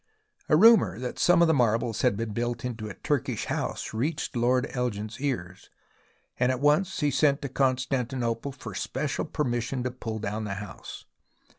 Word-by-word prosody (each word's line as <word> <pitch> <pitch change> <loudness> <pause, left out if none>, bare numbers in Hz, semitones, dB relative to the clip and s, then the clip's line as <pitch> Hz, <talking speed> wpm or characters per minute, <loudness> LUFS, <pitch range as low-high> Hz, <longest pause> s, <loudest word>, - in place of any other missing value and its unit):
A 150 - +6
rumour 190 - +6
that 125 +1 -5
some 175 -1 +5
marbles 115 -2 +1
had 125 -6 +2
been 115 0 -3
built 120 +1 -2
into 110 -3 -4
a 95 - -8
Turkish - - -1
house - - -3
reached 145 +8 -2
Lord 125 +2 +2
Elgin's 115 -2 -3
ears, 95 -10 -4 0.7
and 125 +1 +3
at 130 - -2
once 150 +7 +2
he 145 -1 +2
sent 140 +1 +2
to 140 - -3
Constantinople 130 -1 -1
for 135 - -9
special 135 +2 -2
per 155 -1 -2
mission 120 0 -2
to 125 - -2
pull 115 -3 -5
down 105 +1 -3
the 100 -2 -3
house. 95 -1 -9
125 Hz, 165 wpm, -27 LUFS, 115-140 Hz, 0.7 s, A